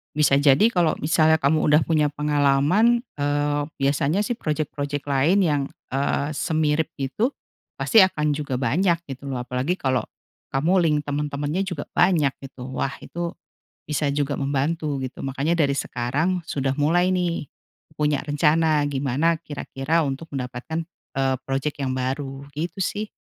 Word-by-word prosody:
bisa 145 -2 +4
jadi 140 +6 +5
kalau 170 -3 +2
misalnya 160 0 +4
kamu 155 +1 +2
udah 150 +2 +5
punya 155 -2 +2
pengalaman, 150 - +3 0.2
eee, 145 0 +1 0.2
biasanya 140 +7 +1
sih 240 - -1
projek-projek 145 -2 -2
lain 145 +7 +3
yang, 145 -3 +2 0.3
eee, 140 +2 0
semirip 155 0 0
itu 140 - 0 0.5
pasti 225 - +4
akan 150 -5 +1
juga 145 -3 -3
banyak 170 +7 +2
gitu 135 0 -8
loh. 130 -2 -2
Apalagi 125 +7 -1
kalau 130 -4 +1 0.5
kamu 150 +7 +1
link 155 -3 +3
teman-temannya 145 +3 -2
juga 180 -7 -4
banyak 155 -7 +3
gitu, 135 -2 -9
wah 135 +1 -2
itu 170 0 -4 0.6
bisa 150 0 0
juga 145 0 -1
membantu 145 +1 -1
gitu. 130 0 -6
Makanya 140 +5 0
dari 140 -3 +3
sekarang 145 +8 -1
sudah 135 -4 -1
mulai 170 +5 +3
nih, 175 -5 -1 0.5
punya 150 -2 +1
rencana 150 0 +2
gimana 145 +3 +1
kira-kira 150 +1 -1
untuk 140 +3 -4
mendapatkan, 130 +6 -4 0.3
eee, 135 -1 +1
projek 135 +2 -3
yang 130 -1 -1
baru 135 +1 -3
gitu 165 +6 -4
sih. 210 +3 -2
145 Hz, 140 wpm, -23 LUFS, 135-160 Hz, 0.6 s, jadi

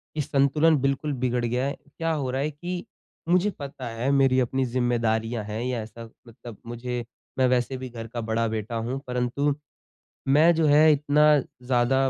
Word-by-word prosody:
कि 155 - 0
संतुलन 145 +3 +3
बिल्कुल 140 +2 0
बिगड़ 125 -1 +1
गया 125 +3 0
है। 140 - -3 0.2
क्या 165 0 -1
हो 140 -4 -2
रहा 135 +1 -1
है 150 +2 -1
कि 175 +4 -5 0.4
मुझे 180 +3 +3
पता 135 -3 -6
है 115 +3 -2
मेरी 135 -2 +4
अपनी 130 +1 0
ज़िम्मेदारियाँ 115 -2 0
हैं 105 +2 -5
या 125 -2 -2
ऐसा 115 +1 -9 0.2
मतलब 115 -1 -11
मुझे 120 0 -4 0.3
मैं 130 - +4
वैसे 125 +1 0
भी 130 0 -7
घर 115 -1 -8
का 120 +1 -5
बड़ा 115 +1 0
बेटा 110 +1 -4
हूँ 120 +4 -2
परंतु, 125 +4 0 0.7
मैं 155 +5 +5
जो 160 -1 +2
है 150 +2 +6
इतना 150 +1 +3
ज़्यादा 125 +1 0
130 Hz, 180 wpm, -25 LUFS, 120-140 Hz, 0.7 s, है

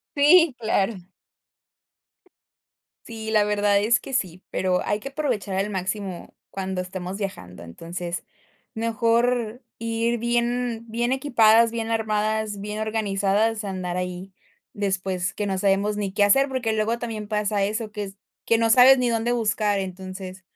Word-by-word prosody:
Sí, 300 +1 +6
claro. 220 -1 +1 2.1
Sí, 220 -1 -6
la 215 -1 +4
verdad 205 -1 +2
es 235 +4 +3
que 270 - -7
sí, 185 -7 -2
pero, 185 -1 0
hay 205 - 0
que 275 - -7
aprovechar 250 -10 -2
al 195 +2 0
máximo 190 -1 -4
cuando 190 -1 -4
estemos 185 +1 -5
viajando. 95 - -6
Entonces, 170 - -6 0.5
mejor 230 +1 0 0.2
ir 230 +1 -1
bien 235 0 -1
bien 240 +3 -1
equipadas, 230 -4 +4
bien 230 -1 -3
armadas, 215 -2 -1
bien 210 +1 -5
organizadas, 215 0 0
a 205 - -5
andar 180 -2 -3
ahí 180 +1 -5 0.4
después 190 -2 -2
que 205 - -2
no 190 -1 -1
sabemos 200 +2 +1
ni 195 -2 -2
qué 205 0 +4
hacer, 270 +7 +4
porque, 245 -4 -1
luego 220 +2 0
también 220 -3 -5
pasa 210 -1 0
eso, 215 +2 -2
que 210 -1 -4
es 195 0 -10 0.3
que 230 - +4
no 225 0 +2
sabes 255 +3 +8
ni 250 -2 +1
dónde 230 +1 0
buscar, 210 -3 +1
entonces, 185 0 -7
210 Hz, 150 wpm, -24 LUFS, 195-230 Hz, 2.1 s, sabes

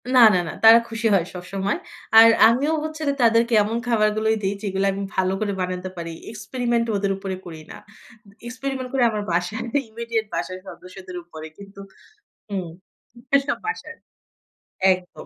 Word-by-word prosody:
না, - - +7 0.2
না, - - +3
না। - - -4
তারা 225 +1 +9
খুশি 225 0 -1
হয় 180 -4 +3
সবসময়। 190 +2 -3 0.4
আর 225 - +10 0.2
আমিও 270 +7 +2
হচ্ছে 310 0 -6 0.2
তাদেরকে 230 0 +3
এমন 225 +3 -2
খাবারগুলোই 220 -1 +2
দেই 195 +1 0
যেগুলা 195 0 0
আমি 200 0 -4
ভালো 190 0 +1
করে 205 -2 -1
বানাতে 185 0 -3
পারি। 170 -1 -5 0.2
এক্সপেরিমেন্ট 235 +2 -2
ওদের 200 0 0
উপরে 195 -1 -5
করি 160 -2 -9
না। - - -9 0.7
এক্সপেরিমেন্ট 260 +1 -5
করে 260 -2 +2
আমার 210 -1 -3
বাসায় 180 +5 -1 0.3
ইমিডিয়েট 230 0 -3
বাসার 185 0 -4
সদস্যদের 185 0 -11
উপরে। 160 -2 -10
কিন্তু 200 0 -13 0.7
হুম, 185 -4 -3 0.7
এসব 275 0 0
বাসায়। 440 - -5 1.0
একদম। 180 0 -10
210 Hz, 150 wpm, -22 LUFS, 185-230 Hz, 1.0 s, আর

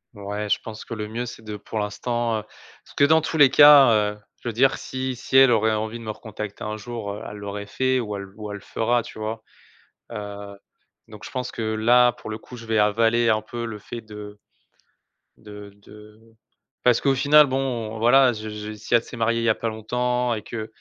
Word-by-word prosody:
Ouais, 105 +1 -5
je - - +2
pense 110 -1 -8
que 115 - -6
le 105 0 -5
mieux 120 +3 -4
c'est 115 - -10
de 105 -1 -6
pour 105 +2 -7
l'instant, 115 +2 -1
heu, 105 - -9 0.4
parce - - -19
que - - +4
dans 160 +2 +5
tous 160 +1 -3
les 140 -3 +7
cas, 145 -3 +8 0.2
heu, 105 - -19 0.2
je - - -8
veux - - -5
dire, 135 +4 +3
si 130 0 -4
si 130 +2 0
elle 135 -2 +7
aurait 110 -1 +3
envie 110 +2 -3
de - - -10
me 110 - -7
recontacter 105 -1 -7
un 105 0 -4
jour, 110 -2 -6
heu, 105 - -8
elle 105 - -9
l'aurait 100 0 -6
fait 130 +3 0
ou 105 -3 -4
elle 100 0 -6
ou 105 -1 -7
elle 105 - -5
le - - -14
fera 120 +4 0
tu 110 - -11
vois? 110 +1 -4 0.7
Heu, 100 -1 -7 0.5
donc 105 -2 -11
je - - -8
pense 125 -1 -4
que - - -6
là, 120 +3 +3
pour 110 - -10
le 110 - -4
coup, 125 - -13
je 115 - -10
vais 110 -1 +1
avaler 115 +3 +3
un 110 -1 +2
peu 115 +2 -6
le 110 -2 -6
fait 120 +3 -8
de 105 -1 -10 1.0
de 105 -1 -11
de 105 +1 -16 0.6
parce 125 -2 +4
qu'au 140 - +2
final 145 +3 +6
bon, 125 -5 -3
voilà, 125 +1 +5
je 110 0 -7
j'ai 105 0 -7
si 110 +3 -1
elle 115 - +3
s'est 120 - -10
mariée 115 +1 +1
il - - -2
y 115 - +2
a 110 - +3
pas 115 - -4
longtemps, 125 +2 -1
et 110 - -4
qu'elle 110 0 -6
110 Hz, 230 wpm, -23 LUFS, 105-120 Hz, 1.0 s, cas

